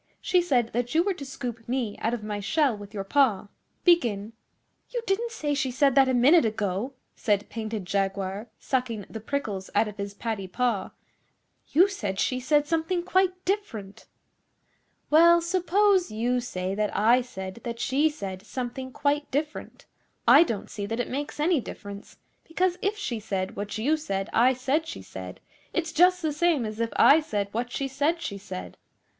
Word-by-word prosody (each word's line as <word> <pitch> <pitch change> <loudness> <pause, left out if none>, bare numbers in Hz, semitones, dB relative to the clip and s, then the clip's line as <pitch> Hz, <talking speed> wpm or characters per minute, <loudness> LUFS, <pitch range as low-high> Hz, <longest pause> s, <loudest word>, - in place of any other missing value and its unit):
She 360 - +2
said 250 -9 +1
that 245 +3 -2
you 330 - +5
were 395 +1 0
to 320 - -9
scoop 235 -3 -6
me 245 -5 -1
out 225 - 0
of 220 - -8
my 210 -1 -3
shell 275 +4 +1
with 205 -1 -10
your 200 -3 -4
paw. 215 -3 +2 0.3
Begin.' 230 - +2 0.6
'You 480 -2 -3
didn't 455 +4 0
say 300 -10 -2
she 275 -2 0
said 275 +2 +3
that 270 -1 +5
a - - +2
minute 280 +7 +6
ago, 215 +2 -2 0.2
said 205 -2 0
Painted 220 -3 -4
Jaguar, 195 +2 -2
sucking 240 -6 -2
the 220 - -5
prickles 215 -6 -3
out 220 - +4
of 210 - -8
his 200 0 -5
paddy 215 -3 -3
paw. 220 -1 -1 0.8
'You 355 +6 +5
said 205 - -4
she 255 - +1
said 295 +3 +2
something 330 +3 0
quite 370 0 +1
different.' 230 - -3 1.0
'Well, 340 +2 +7
suppose 370 +2 +2
you 240 +3 0
say 185 -6 -3
that 210 +1 -1
I 235 +4 +5
said 190 -3 -8
that 235 -1 -5
she 280 +5 +2
said 195 -11 -6
something 260 +2 -5
quite 290 +2 0
different, 300 +2 -4 0.4
I - - +9
don't 230 - -1
see 205 -1 -4
that 225 +3 -3
it 245 - -2
makes 285 +3 -4
any 320 +1 +3
difference; 200 -2 -9 0.3
because 360 +2 0
if 410 +2 0
she 255 - -3
said 195 -3 -3
what 205 +1 -4
you 275 +9 +2
said 195 -9 -3
I 250 +3 +5
said 270 +5 0
she 325 - -7
said, - - -9 0.3
it's 335 -2 -1
just 360 +2 +4
the 310 -2 0
same 305 -5 +2
as 215 0 -6
if 230 0 0
I 295 - +7
said 210 -11 -2
what 240 +3 -3
she 275 +2 -2
said 290 +5 0
she 200 -11 -5
said. 185 -2 -8
250 Hz, 180 wpm, -26 LUFS, 210-315 Hz, 1.0 s, I